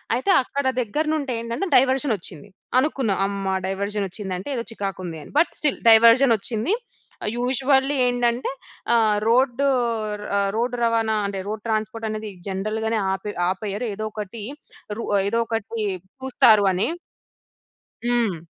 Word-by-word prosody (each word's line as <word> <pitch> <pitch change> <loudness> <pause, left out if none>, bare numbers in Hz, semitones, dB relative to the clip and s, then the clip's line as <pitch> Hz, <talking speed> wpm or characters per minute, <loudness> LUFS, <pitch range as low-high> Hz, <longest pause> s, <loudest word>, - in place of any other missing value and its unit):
అయితే 260 +11 +1
అక్కడ 280 +2 -4 0.2
దగ్గర 295 +8 -1
నుండి 280 -4 -2
ఏంటంటే 235 +12 -3
డైవర్షన్ 265 0 +3
వచ్చింది. 170 0 -9 0.3
అనుకున్నా 260 -7 0
అమ్మా! 195 -1 -2
డైవర్షన్ 200 +1 -2
వచ్చింది 190 0 -5
అంటే 190 - -7
ఏదో 235 - -2
చికాకు 195 -4 -4
ఉంది 165 -2 -6
అని - - -14
బట్ 335 - +3
స్టిల్ 295 -3 +1
డైవర్జన్ 230 +3 +7
వచ్చింది. 225 - -1 0.6
యూజువల్లీ 265 +3 +2
ఏంటంటే 245 0 0 0.4
ఆహ్, 215 -2 +3
రోడ్డు 255 +3 +3 0.7
ఆ! - - +3 0.2
రోడ్ 245 +2 0
రవాణా 225 -1 +2
అంటే 195 -1 -4
రోడ్ 215 0 -5
ట్రాన్స్‌పోర్ట్ 220 0 -2
అనేది 215 -1 -5 0.2
జనరల్‌గానే 215 +3 -1
ఆపే 205 +2 -5 0.2
ఆపేయరు. 205 +4 -3
ఏదో 215 +1 -4
ఒకటి 210 +1 -6 0.5
రూ 230 - -4 0.3
ఏదో 230 +2 0
ఒకటి 225 0 -3 0.4
చూస్తారు 225 -5 +5
అని. 185 +2 +1 1.2
హ్మ్. 230 -9 0
225 Hz, 135 wpm, -23 LUFS, 205-250 Hz, 1.2 s, డైవర్జన్